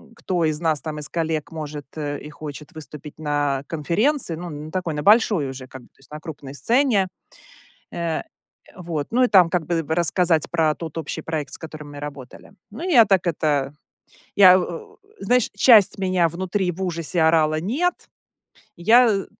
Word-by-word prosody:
кто 180 Hz, -7 st, -1 dB
из 155 Hz, -1 st, -1 dB
нас 160 Hz, -3 st, +1 dB
там, 155 Hz, -1 st, -5 dB
из 145 Hz, -, -3 dB
коллег 160 Hz, -2 st, -2 dB
может, 150 Hz, -3 st, -7 dB
э, 145 Hz, -2 st, -4 dB
и 150 Hz, -, -10 dB
хочет 150 Hz, +2 st, -9 dB
выступить 150 Hz, -1 st, -10 dB
на 145 Hz, -3 st, -1 dB
конференции. 170 Hz, -, 0 dB
Ну, 175 Hz, +1 st, -7 dB
на 150 Hz, +1 st, -8 dB
такой, 180 Hz, -4 st, -3 dB
на 150 Hz, 0 st, -4 dB
большой 205 Hz, -, +4 dB
уже, 130 Hz, -1 st, -8 dB
как 130 Hz, 0 st, -11 dB
бы, -, -, -19 dB
то -, -, -36 dB
есть 135 Hz, -, -16 dB
на 150 Hz, -, -7 dB
крупной 145 Hz, -4 st, -9 dB
сцене. 220 Hz, -, +2 dB, 0.9 s
Э, 170 Hz, -2 st, -2 dB, 0.5 s
вот, 165 Hz, -5 st, -4 dB
ну 250 Hz, +2 st, +3 dB
и -, -, +4 dB
там, 185 Hz, -6 st, +5 dB
как 175 Hz, -3 st, -1 dB
бы 165 Hz, +1 st, -1 dB
бы 160 Hz, +2 st, -2 dB
рассказать 170 Hz, -1 st, +1 dB
про 160 Hz, -3 st, +1 dB
тот 165 Hz, -2 st, -8 dB
общий 155 Hz, -2 st, -4 dB
проект, 155 Hz, -4 st, -4 dB
с -, -, -5 dB
которым 155 Hz, -2 st, -10 dB
мы 145 Hz, -, -9 dB
работали. 140 Hz, -3 st, -9 dB, 0.2 s
Ну, 325 Hz, -, -6 dB
я 245 Hz, -10 st, +6 dB
так 190 Hz, -3 st, +2 dB
это, 145 Hz, -4 st, 0 dB, 0.6 s
я, 185 Hz, -2 st, +8 dB
о, 175 Hz, -2 st, -7 dB, 0.2 s
знаешь, 250 Hz, -, +1 dB
часть 210 Hz, -2 st, +6 dB
меня 185 Hz, -3 st, +1 dB
внутри 185 Hz, +2 st, -2 dB
в 190 Hz, +3 st, -6 dB
ужасе 170 Hz, -1 st, -2 dB
орала: 155 Hz, -1 st, +3 dB
"Нет!" 300 Hz, -, 0 dB, 0.8 s
Я, 220 Hz, +2 st, +4 dB
165 Hz, 180 wpm, -22 LUFS, 150-185 Hz, 0.9 s, я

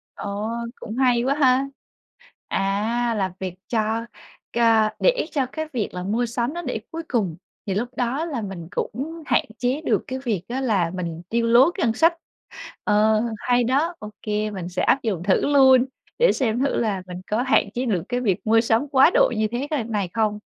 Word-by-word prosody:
Ờ, 205 Hz, +1 st, -4 dB, 0.3 s
cũng 225 Hz, +1 st, -7 dB
hay 250 Hz, -2 st, +3 dB
quá 270 Hz, +2 st, +1 dB
ha! 265 Hz, -2 st, +3 dB, 0.8 s
À, 220 Hz, +5 st, 0 dB
là 190 Hz, -2 st, -1 dB
việc 185 Hz, -2 st, -4 dB
cho 225 Hz, 0 st, 0 dB, 0.5 s
c -, -, -14 dB, 0.4 s
để -, -, +2 dB
cho 275 Hz, -4 st, +1 dB
cái 315 Hz, +4 st, -5 dB
việc 230 Hz, -6 st, -1 dB
là 180 Hz, -, -4 dB
mua 220 Hz, +6 st, 0 dB
sắm 240 Hz, +4 st, -2 dB
nó 345 Hz, -, -4 dB
để 250 Hz, -6 st, -3 dB
cuối 330 Hz, 0 st, -5 dB
cùng 195 Hz, -10 st, 0 dB, 0.3 s
thì 195 Hz, -, -1 dB
lúc 225 Hz, +5 st, -1 dB
đó 255 Hz, +6 st, -1 dB
là 285 Hz, -9 st, -3 dB
mình 185 Hz, -5 st, -7 dB
cũng 295 Hz, +10 st, -4 dB
hạn 250 Hz, -, +2 dB
chế 255 Hz, +4 st, 0 dB
được 315 Hz, -, 0 dB
cái 260 Hz, -2 st, -4 dB
việc 230 Hz, -9 st, -2 dB
á 255 Hz, +3 st, -2 dB
là 200 Hz, -10 st, +1 dB
mình 170 Hz, -2 st, -4 dB
tiêu 230 Hz, 0 st, 0 dB
lố 240 Hz, +7 st, +6 dB
cái 350 Hz, -4 st, -1 dB
ngân 225 Hz, -, +1 dB
sách. 330 Hz, +7 st, +4 dB, 0.7 s
Ờ, 215 Hz, +1 st, +3 dB, 0.2 s
hay 245 Hz, +1 st, +2 dB
đó, 280 Hz, +8 st, +1 dB
ô 210 Hz, -, -7 dB
kê 210 Hz, 0 st, -1 dB
mình 185 Hz, -4 st, -5 dB
sẽ 180 Hz, 0 st, -2 dB
áp 270 Hz, -, +3 dB
dụng 195 Hz, -7 st, -2 dB
thử 190 Hz, 0 st, +3 dB
luôn, 265 Hz, -2 st, +6 dB, 0.3 s
để -, -, +5 dB
xem 240 Hz, -3 st, 0 dB
thử 275 Hz, +1 st, +1 dB
là 210 Hz, -5 st, 0 dB
mình 180 Hz, 0 st, -7 dB
có 215 Hz, +3 st, +2 dB
hạn 255 Hz, -5 st, +3 dB
chế 250 Hz, +2 st, -2 dB
được 190 Hz, -9 st, 0 dB
cái 245 Hz, 0 st, 0 dB
việc 195 Hz, -7 st, +1 dB
mua 225 Hz, +1 st, +5 dB
sắm 230 Hz, +5 st, +1 dB
quá 270 Hz, +4 st, +6 dB
độ -, -, +4 dB
như 215 Hz, -, +2 dB
thế 250 Hz, +4 st, -2 dB, 0.2 s
c -, -, -10 dB
này 205 Hz, -5 st, -1 dB
không. 215 Hz, -2 st, 0 dB
235 Hz, 210 wpm, -23 LUFS, 210-260 Hz, 0.8 s, lố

